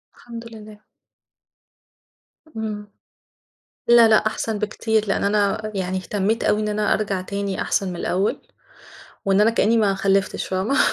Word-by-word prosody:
الحمد 235 -1 -10
لله. 215 -1 -12 1.7
إمم. 210 -1 -4 1.0
لا 235 -1 +7
لأ، 215 - +6
أحسن 215 0 -2
بكتير، 220 +1 -1
لأن 195 - 0
أنا 210 +1 0
يعني 185 -1 -2
اهتميت 205 +4 -1
أوي 210 - +2
إن 215 - -1
أنا 210 0 +1
أرجع 200 -3 -1
تاني 200 0 -3
أحسن 195 - 0
من 180 - -5
الأول 185 +4 -1 0.8
وإن 195 +1 +3
أنا 220 +2 +5
كأني 230 0 +2
ما 205 -3 +2
خلفتش 195 0 0
فاهمة؟ 190 +9 -1
210 Hz, 135 wpm, -22 LUFS, 195-220 Hz, 1.7 s, لا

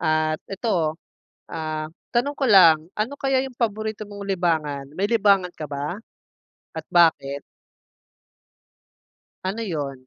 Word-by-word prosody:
At 155 -1 +1
ito, 185 -6 -1 0.6
ah, 155 -1 -4 0.2
tanong 280 +5 +1
ko 270 - +2
lang, 165 -7 +7
ano 220 +6 -2
kaya 270 -1 +1
yung 265 - -6
paborito 215 -2 -2
mong 200 -1 -8
libangan? 160 -7 -1
May 200 +4 -1
libangan 200 -5 +3
ka 155 -3 -7
ba? 145 +7 -4 0.8
At - - -4
bakit? 150 -5 +3 2.0
Ano 195 +5 -3
'yon? 140 - -4
180 Hz, 120 wpm, -23 LUFS, 155-215 Hz, 2.0 s, lang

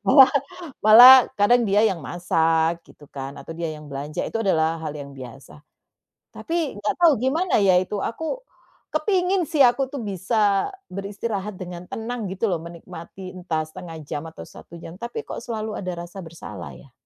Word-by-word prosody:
Malah 265 +1 +8 0.5
malah 240 +5 +11 0.2
kadang 240 +4 +4
dia 205 0 +3
yang 180 -7 -2
masak 165 +2 0
gitu 145 - -18
kan, 135 0 -7
atau 165 - -9
dia 165 -1 -3
yang 150 -1 -9
belanja 140 +2 -4
itu - - -4
adalah 160 -4 +1
hal 155 - -3
yang 140 -1 -9
biasa. 135 +3 -12 0.7
Tapi 325 -10 -3
nggak 210 0 -1
tahu 330 -3 +7
gimana 315 +7 +1
ya 190 -2 +4
itu, 205 +2 -4
aku, 320 - -3 0.5
kepingin 375 -3 +1
sih 300 - -1
aku 260 +2 +1
tuh 280 - -4
bisa 200 - +1 0.2
beristirahat 200 +1 -5
dengan 180 -1 -7
tenang 230 0 -5
gitu 190 - -4
loh 175 -4 -1
menikmati 170 +2 -10
entah 165 -3 -2
1/2 165 +1 -9
jam 145 - -3
atau 160 - -10
1 170 - -13
jam 165 +2 -11
tapi 235 0 -5
kok - - -7
selalu 220 -3 -5
ada 180 -2 -4
rasa 185 +3 -10
bersalah 105 - -9
ya? 65 - -17
185 Hz, 170 wpm, -23 LUFS, 160-230 Hz, 0.7 s, malah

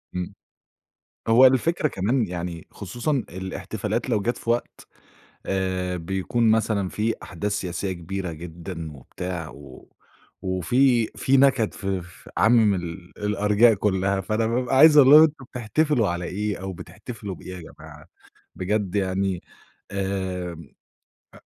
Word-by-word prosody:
إمم. 90 -1 -3 0.9
هو 120 +4 +7
الفكرة 150 +5 +3
كمان 115 +3 0
يعني 85 -1 -5
خصوصًا 115 - -4 0.2
الاحتفالات 95 +6 -4
لو 110 -4 +1
جات 120 +4 -1
في 115 - -7
وقت 120 +1 -2 0.6
آآ، 95 -1 -1
بيكون 95 +7 0
مثلًا 110 -3 +1
فيه 110 +4 -1
أحداث 95 +4 -4
سياسية 95 -1 -2
كبيرة 90 +1 -5
جدًا 80 0 -7
وبتاع، 85 +4 -6
و 70 -2 -13 0.5
وفيه 115 +6 +2
فيه 135 - +3
نكد 135 -5 +3
ف 95 - -8
ف 90 -3 -5
عامم 110 -3 +5
ال 85 0 -7
الأرجاء 105 +2 +4
كلّها، 95 -1 0
فأنا 110 +4 0
بابقى 125 +3 0
عايز 155 +2 +8
أقول 135 -2 +8
لهم 150 +1 +10
أنتم 155 -3 +1
بتحتفلوا 125 +1 +1
على 85 0 -2
إيه 105 +3 -2
أو 95 0 -5
بتحتفلوا 100 +1 -8
بإيه 90 +2 -9
يا - - -8
جماعة 80 0 -13 0.5
بجد 100 +1 -1
يعني، 95 -1 0 0.5
آمم، 95 -4 -3 0.6
أ - - -14
100 Hz, 135 wpm, -24 LUFS, 90-115 Hz, 0.9 s, لهم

